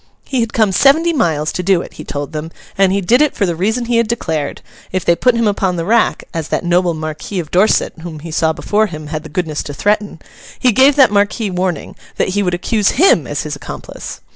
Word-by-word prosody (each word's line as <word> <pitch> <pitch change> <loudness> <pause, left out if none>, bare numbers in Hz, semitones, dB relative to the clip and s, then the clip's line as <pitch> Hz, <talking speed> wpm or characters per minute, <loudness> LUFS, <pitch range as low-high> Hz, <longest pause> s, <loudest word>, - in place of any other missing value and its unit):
He 260 - -2
had 230 -1 0
come 215 -3 +2
seventy 315 - +4
miles 160 - 0
to - - -3
do 180 -1 +2
it, - - -12
he - - -9
told 145 0 -5
them, 155 0 -5 0.3
and 195 -1 +3
he 200 +1 +1
did 235 +9 +3
it 300 -2 +2
for 205 - +1
the 170 -2 -1
reason 220 +8 -1
he 235 0 +1
had 230 -1 +2
declared; 160 -10 -3 0.3
if 185 -1 -2
they 170 - +4
put 250 +6 +2
him 230 -1 +1
upon 195 -3 0
the 165 -1 -3
rack, 230 +4 +2
as 165 -3 -3
that - - -2
noble 175 -1 +2
Marquis 155 +5 -5
of 155 -3 -6
Dorset 190 +5 +2
whom 165 -2 -7
he 165 +1 -8
saw 160 +1 +1
before 210 +6 0
him, 155 -4 -8
had 155 - -2
the 160 - -11
goodness 155 -1 -2
to 145 - -7
threaten, 205 -1 0 0.4
he 250 - +3
gave 265 +5 +5
that 270 -5 +5
marquis 205 +1 +1
warning, 180 -3 -3 0.2
that - - 0
he 205 +2 0
would 180 -3 0
accuse 205 +3 +1
him 380 - +4
as - - -3
his - - -4
accomplice! - - -8
190 Hz, 240 wpm, -16 LUFS, 165-225 Hz, 0.4 s, gave